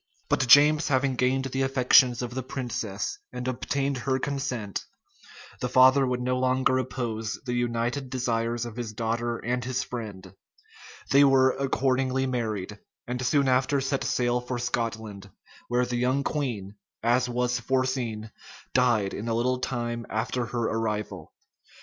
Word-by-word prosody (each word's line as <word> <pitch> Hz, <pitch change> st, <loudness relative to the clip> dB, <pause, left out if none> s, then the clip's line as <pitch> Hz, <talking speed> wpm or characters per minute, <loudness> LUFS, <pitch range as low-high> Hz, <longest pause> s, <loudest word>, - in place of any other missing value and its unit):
But 130 Hz, -, +1 dB
James 150 Hz, +4 st, +7 dB
having 135 Hz, -1 st, +1 dB
gained 130 Hz, +2 st, +1 dB
the 135 Hz, 0 st, -2 dB
affections 130 Hz, -1 st, +4 dB
of 120 Hz, 0 st, -5 dB
the 130 Hz, -, -2 dB
princess, 120 Hz, -, -4 dB
and 125 Hz, -, -5 dB
obtained 135 Hz, +1 st, -1 dB
her 130 Hz, +1 st, 0 dB
consent, 130 Hz, -7 st, -3 dB, 0.8 s
the 125 Hz, -, -2 dB
father 130 Hz, +2 st, +6 dB
would 125 Hz, 0 st, -1 dB
no 125 Hz, 0 st, 0 dB
longer 130 Hz, 0 st, +2 dB
oppose 115 Hz, -4 st, -3 dB
the 125 Hz, -, -2 dB
united 120 Hz, +2 st, -1 dB
desires 120 Hz, -2 st, -1 dB
of 120 Hz, -1 st, -8 dB
his 115 Hz, -3 st, -4 dB
daughter 115 Hz, +1 st, -2 dB
and 125 Hz, +2 st, -2 dB
his 125 Hz, 0 st, -2 dB
friend: 100 Hz, -6 st, -7 dB, 0.8 s
they 140 Hz, +1 st, +7 dB
were 135 Hz, -1 st, +5 dB
accordingly 135 Hz, -1 st, 0 dB
married, 110 Hz, -5 st, -3 dB, 0.3 s
and 125 Hz, +1 st, -3 dB
soon 140 Hz, +2 st, +2 dB
after 130 Hz, +2 st, +2 dB
set 135 Hz, 0 st, -1 dB
sail 120 Hz, 0 st, 0 dB
for 125 Hz, 0 st, -4 dB
Scotland, 110 Hz, -4 st, -3 dB, 0.4 s
where 125 Hz, +1 st, +1 dB
the 125 Hz, 0 st, -3 dB
young 130 Hz, +3 st, +1 dB
queen, 110 Hz, -11 st, -3 dB, 0.3 s
as 120 Hz, +2 st, +2 dB
was 125 Hz, 0 st, 0 dB
foreseen, 125 Hz, -4 st, -1 dB, 0.4 s
died 120 Hz, -6 st, +2 dB
in 110 Hz, -, -5 dB
a 115 Hz, -, 0 dB
little 125 Hz, +2 st, +1 dB
time 120 Hz, -2 st, -3 dB
after 120 Hz, +2 st, -2 dB
her 120 Hz, 0 st, -2 dB
arrival. 110 Hz, -2 st, -3 dB
125 Hz, 150 wpm, -26 LUFS, 115-130 Hz, 0.8 s, James